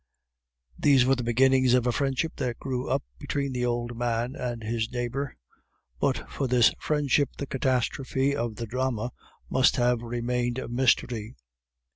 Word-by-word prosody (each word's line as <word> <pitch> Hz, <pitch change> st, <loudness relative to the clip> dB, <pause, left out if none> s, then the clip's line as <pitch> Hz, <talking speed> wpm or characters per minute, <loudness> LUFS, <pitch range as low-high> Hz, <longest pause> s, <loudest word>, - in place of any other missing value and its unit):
These 135 Hz, -4 st, +5 dB
were 135 Hz, -, +4 dB
the 125 Hz, -, -3 dB
beginnings 130 Hz, +1 st, +4 dB
of 125 Hz, -1 st, +2 dB
a 125 Hz, -, +3 dB
friendship 135 Hz, +5 st, -1 dB
that 120 Hz, -2 st, -2 dB
grew 130 Hz, -2 st, -3 dB
up -, -, +1 dB, 0.2 s
between 140 Hz, -1 st, -2 dB
the 125 Hz, -1 st, 0 dB
old 120 Hz, 0 st, -2 dB
man 120 Hz, +1 st, -1 dB
and 120 Hz, -2 st, -4 dB
his 110 Hz, 0 st, -2 dB
neighbor; 125 Hz, +3 st, -3 dB, 0.6 s
but -, -, 0 dB
for 135 Hz, -, -2 dB
this 125 Hz, -1 st, +5 dB
friendship 145 Hz, -2 st, +1 dB
the 140 Hz, -, -3 dB
catastrophe 130 Hz, +1 st, 0 dB
of 120 Hz, -5 st, -2 dB
the 115 Hz, -, -4 dB
drama 125 Hz, 0 st, -2 dB, 0.4 s
must 130 Hz, 0 st, +3 dB
have 120 Hz, -1 st, +2 dB
remained 120 Hz, +1 st, -2 dB
a -, -, -4 dB
mystery. 120 Hz, -2 st, +1 dB
125 Hz, 155 wpm, -27 LUFS, 120-130 Hz, 0.6 s, These